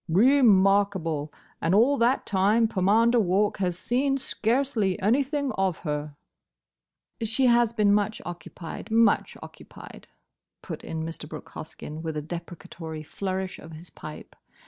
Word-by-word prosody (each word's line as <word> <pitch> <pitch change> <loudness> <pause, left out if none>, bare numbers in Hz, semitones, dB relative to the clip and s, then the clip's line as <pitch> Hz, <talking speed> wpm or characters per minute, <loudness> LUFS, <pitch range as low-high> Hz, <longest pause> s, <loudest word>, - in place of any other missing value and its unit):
"Re 250 - +5
markable! 195 - +3 0.3
And 165 +3 +2
all 245 +7 +5
that 240 +3 +2
time 210 +4 +3
Pomander 220 +5 +3
Walk 205 +2 +1
has 180 -3 -1
seen 270 +7 0
scarcely 230 -5 0
anything 275 +6 +1
of 190 -3 +1
her." 150 -1 -3 1.1
"She 225 +4 +1
has 240 -2 +4
been 210 -3 +3
much 210 +1 0
occupied—much 175 +6 -1
occupied," - - -13 0.6
put - - -7
in 160 -1 -4
Mr. 160 -2 -7
Brooke 155 - -9
Hoskyn, 155 0 -8
with 160 -2 -4
a - - -2
deprecatory 165 -1 -8
flourish 190 +3 -4
of 160 - -11
his 160 +1 -12
pipe. - - -10
195 Hz, 130 wpm, -26 LUFS, 165-230 Hz, 1.1 s, Re